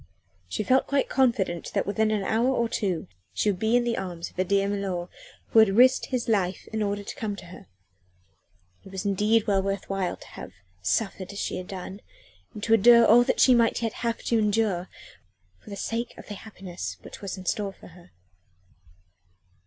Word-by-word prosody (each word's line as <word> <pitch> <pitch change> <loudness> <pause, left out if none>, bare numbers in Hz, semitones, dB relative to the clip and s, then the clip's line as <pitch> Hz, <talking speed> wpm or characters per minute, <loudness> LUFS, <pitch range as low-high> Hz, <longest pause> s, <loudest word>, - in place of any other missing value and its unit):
She 215 - -2
felt 260 +5 +3
quite 280 -1 +1
confident 210 -10 +1
that - - +1
within 215 +2 +1
an 215 -2 0
hour 225 +5 +1
or 235 -3 +1
two 185 -8 -2 0.3
she 210 - +2
would 185 - -6
be 220 +3 +2
in 245 - +4
the 240 -1 -1
arms 175 -3 -6
of - - -30
her 185 - +1
dear 195 +1 +1
milor 195 -3 -3 0.4
who 225 - +5
had 210 -2 +5
risked 255 +1 +5
his 255 -3 -2
life 195 -5 0
in 220 - -1
order 205 0 -1
to - - -7
come 210 -2 -3
to - - -11
her. 175 - -13 1.2
It 195 - -13
was 190 +1 -5
indeed 210 +3 +2
well 200 -3 +2
worth 195 0 -3
while 190 -2 -1
to - - -14
have - - -10 0.3
suffered 195 - -1
as 200 - -9
she - - -2
had 185 - -7
done, 190 +1 -7 0.6
to 225 +2 +1
endure 235 +2 +7
all 235 +3 +7
that - - 0
she 255 - +7
might 230 -1 +2
yet 225 - -1
have 230 -1 -3
to 230 - +1
endure, 210 -4 0 0.7
for - - -15
the 200 - -6
sake 230 +4 -4
of - - -12
the - - -4
happiness 195 -3 -7
which - - -11
was 200 -1 -5
in 185 - -9
store 200 +1 -1
for - - -15
her. 175 +1 -17
205 Hz, 200 wpm, -26 LUFS, 190-225 Hz, 1.2 s, endure